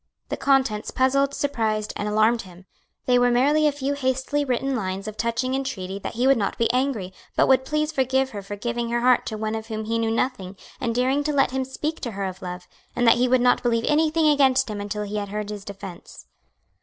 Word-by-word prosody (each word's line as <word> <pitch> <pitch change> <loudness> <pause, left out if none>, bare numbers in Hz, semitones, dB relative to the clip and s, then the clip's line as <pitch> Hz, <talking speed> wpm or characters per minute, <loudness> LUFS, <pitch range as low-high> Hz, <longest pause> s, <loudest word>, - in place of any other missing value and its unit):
The - - -1
contents 265 -6 +1
puzzled, 275 +2 +1
surprised, 220 -6 -1
and 205 - -3
alarmed 215 +2 +3
him. 185 -1 -14 0.4
They 250 -1 +4
were 245 0 +4
merely 290 +5 +3
a - - +3
few 280 0 -2
hastily 265 +1 -1
written 270 0 -1
lines 195 -2 -3
of 215 - -6
touching 235 +3 -1
entreaty 200 -8 -3
that - - -6
he 245 +3 +1
would 270 -2 +5
not 200 - -2
be 230 +1 +1
angry, 250 -8 -1 0.2
but - - +3
would 260 0 +4
please 305 +2 0
forgive 265 -2 +1
her 205 - -6
for 200 +1 -7
giving 235 +2 -3
her 235 0 0
heart 250 0 +3
to 220 - -4
one 215 0 -2
of 220 0 -5
whom 220 -1 -4
he 230 +1 -1
knew 225 0 0
nothing, 225 -5 -2 0.2
and 230 -2 -2
daring 260 +4 +1
to 305 - +1
let 275 -2 +3
him 265 0 -1
speak 300 +4 -4
to 235 -4 -5
her 195 0 -3
of 185 0 -6
love; 180 0 -7 0.3
and 245 - +1
that 230 - +6
he 250 - +3
would 255 0 +3
not 245 0 +3
believe 230 -1 +1
anything 310 +1 +3
against 265 -4 +3
him 205 -1 -4
until 205 +1 -3
he 210 +1 -4
had 205 -1 -3
heard 210 0 -4
his 205 -1 -7
defence. 195 -3 -10
240 Hz, 230 wpm, -24 LUFS, 210-265 Hz, 0.4 s, that